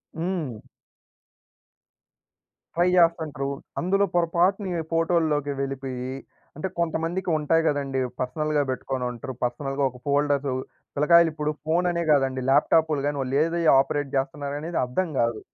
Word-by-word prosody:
హ్మ్. 160 - -3 2.1
ట్రై 175 +2 +3
జేస్తాంటురు. 160 -6 +2 0.3
అందులో 195 +3 +2
పొరపాటున 175 +1 +1
ఫోటోల్లోకి 160 -3 +1
వెళ్ళిపోయి 130 -2 -4 0.5
అంటే 170 +5 -2
కొంతమందికి 170 +2 -1
ఉంటాయి 165 +2 +2
గదండీ! 140 -2 0 0.2
పర్సనల్‌గా 150 +3 0
పెట్టుకొని 130 0 -3
ఉంటారు. 120 +2 -7
పర్సనల్‌గా 135 +3 -1
ఒక 125 -1 -14
ఫోల్డర్స్ 145 -1 +1 0.5
పిల్లకాయలు 170 +3 +5
ఇప్పుడు 150 -1 -1
ఫోన్ 170 +3 +2
అనే 170 0 -1
గాదండి, 135 -2 +2
ల్యాప్‌టాప్లు 150 +1 +3
గాని 145 -1 -2
వాళ్ళు 135 +1 -1
ఏది 170 +1 -1 0.2
ఆపరేట్ 140 +1 0
జేస్తున్నారనేది 145 +4 -2
అర్థం 165 +9 -1
గాదు. 115 -2 +1
150 Hz, 115 wpm, -25 LUFS, 135-170 Hz, 2.1 s, పిల్లకాయలు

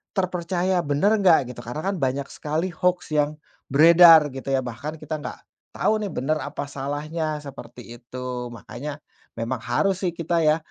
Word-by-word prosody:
terpercaya, 180 -1 0
bener 145 +8 +2
nggak, 165 -10 +4
gitu. 120 - -11
Karena 135 +7 -5
kan 200 - -1
banyak 135 +1 -1
sekali 155 +5 -2
hoaks 180 0 -1
yang 150 0 +1 0.3
beredar, 165 +1 +8
gitu, 135 +1 -9
ya, 130 - +2
bahkan 130 +5 -6
kita 155 0 -5
nggak 145 - -7 0.4
tau, 215 - +2
nih, 205 -3 -3
benar 155 +4 0
apa 145 0 -5
salahnya, 150 +3 -3
seperti 120 -4 -10
itu. 125 0 -6
Makanya 125 +7 -7 0.4
memang 115 +3 -2
harus, 195 -1 0
sih, 175 - 0
kita, 170 0 -1
ya, 155 +1 +4
150 Hz, 165 wpm, -24 LUFS, 130-170 Hz, 0.4 s, beredar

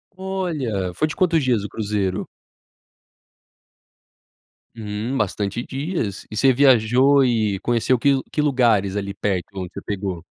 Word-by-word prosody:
Olha! 160 - -3
Foi 155 - 0
de 155 - -6
quantos 165 -4 +2
dias 120 -6 +1
o 105 - -5
cruzeiro? 105 -3 -2 2.5
Hum, 110 +3 -4
bastante 105 +1 -2
dias. 135 - -4
E - - -8
você 130 +4 +4
viajou 130 +1 +4
e 110 -6 +1
conheceu 120 +3 +1
que 135 +2 +2
que 150 - 0
lugares 120 -9 +2
ali 100 -1 -3
perto 100 -3 -2
de 100 - -7
onde 90 -1 -6
você - - -7
pegou? 95 -4 -4
115 Hz, 140 wpm, -22 LUFS, 100-135 Hz, 2.5 s, você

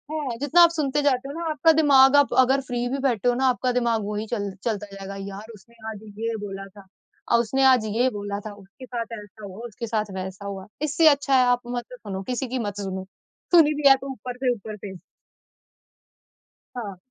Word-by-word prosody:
हाँ, 275 -6 -3
जितना 290 +5 +4
आप 340 - +8
सुनते 295 -3 -1
जाते 270 -2 +1
हो - - -6
ना 340 - -4
आपका 320 +1 +4
दिमाग 285 -3 +6
आप 285 -1 +4
अगर 265 +2 +4
फ्री 245 -2 -3
भी 275 - -2
बैठे 245 -4 +1
हो - - +3
ना 265 +1 0
आपका 250 0 0
दिमाग 235 -3 0
वही 210 +1 -3
चल 205 -4 -3
चलता 210 -3 -2
जाएगा 195 0 -7
यार 210 +4 -9
उसने 220 +3 -18
आज 215 - -7 0.2
ये 230 0 -2
बोला 195 0 -7
था 200 - -13 0.5
अ, - - +6
उसने 265 +4 0
आज 255 -4 +5
ये 235 +5 +1
बोला 205 -2 -5
था, 210 0 -8
उसके 205 +6 -14
साथ 235 -2 -4
ऐसा 210 +1 -13
हुआ 195 +2 -10
उसके 230 +1 -7
साथ 215 -2 -2
वैसा 190 +1 -6
हुआ, 195 -1 -6 0.2
इससे 310 +2 +3
अच्छा 285 -2 +4
है 255 - +6
आप 245 0 +3 0.2
मत 240 -1 -3
सुनो 200 -6 -6
किसी 255 +2 -2
की 255 +1 -3
मत 205 -3 -4
सुनो। 190 -1 -4 0.5
सुनी 305 -3 +6
भी 280 - +5
है 270 - +8
तो 275 - -5
ऊपर 250 0 -7
से 255 -1 +1
ऊपर 215 -1 -8
से। 195 -1 -8 1.8
हाँ। 205 -5 -5
235 Hz, 215 wpm, -24 LUFS, 205-270 Hz, 1.8 s, आप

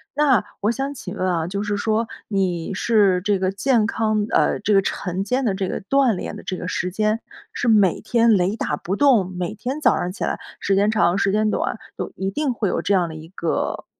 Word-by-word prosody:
那 275 -7 +3 0.2
我 210 +2 +2
想 270 +3 -3
请 205 -8 -7
问 185 - 0
啊， 165 -3 0
就 200 +3 -3
是 205 -1 -1
说 220 +2 0 0.2
你 185 -3 -1
是 200 -3 +3
这 205 -2 +2
个 185 0 0
健 230 +2 +2
康 215 -1 0
呃， - - +2
这 210 +1 +1
个 195 - +5
晨 190 0 -3
间 255 +6 0
的 220 -6 +1
这 190 -1 -2
个 - - -4
锻 265 +3 +2
炼 - - -5
的 - - -10
这 190 - -3
个 180 - -5
时 180 0 -2
间， 215 +3 0 0.3
是 245 - -3
每 205 -6 +4
天 230 0 +3
雷 185 +3 +1
打 150 -9 -2
不 185 +5 -3
动， 235 -8 +4
每 180 +1 -3
天 255 +8 -4
早 - - +4
上 180 +1 -2
起 - - -5
来， - - -1 0.2
时 195 - +1
间 200 +2 +3
长、 200 -4 +2
时 195 0 +1
间 215 0 +2
短， - - -1 0.2
都 - - -3
一 190 0 -2
定 285 +3 -1
会 215 -4 -1
有 - - -1
这 205 - +1
样 180 -3 +2
的 160 - -8
一 155 0 -10
个， 170 -3 -2
205 Hz, 255 characters per minute, -22 LUFS, 185-225 Hz, 0.3 s, 个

